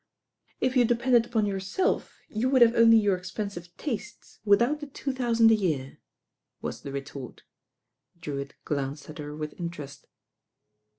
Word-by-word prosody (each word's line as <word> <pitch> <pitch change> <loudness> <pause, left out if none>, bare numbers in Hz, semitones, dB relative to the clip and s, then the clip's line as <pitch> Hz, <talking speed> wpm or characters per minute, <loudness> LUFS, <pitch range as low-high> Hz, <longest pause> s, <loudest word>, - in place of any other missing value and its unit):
"If 255 0 0
you 250 - +6
depended 240 0 +3
upon 225 -3 +1
yourself, 195 - -1
you 230 +4 -1
would 260 -2 +6
have 230 0 +5
only 230 -1 +7
your 205 -3 +3
expensive 185 -1 -6
tastes 230 -5 -6
without 235 +8 +3
the 295 - -7
two 275 0 -4
thousand 230 -3 +4
a - - +7
year," 155 -11 -1 0.6
was - - -5
the 140 - -7
retort. 135 -2 -7 0.8
Drewitt 140 -3 -5
glanced 140 +1 -3
at 155 - -11
her 150 0 -6
with 150 0 -5
interest. 150 -6 -7
205 Hz, 150 wpm, -27 LUFS, 150-235 Hz, 0.8 s, only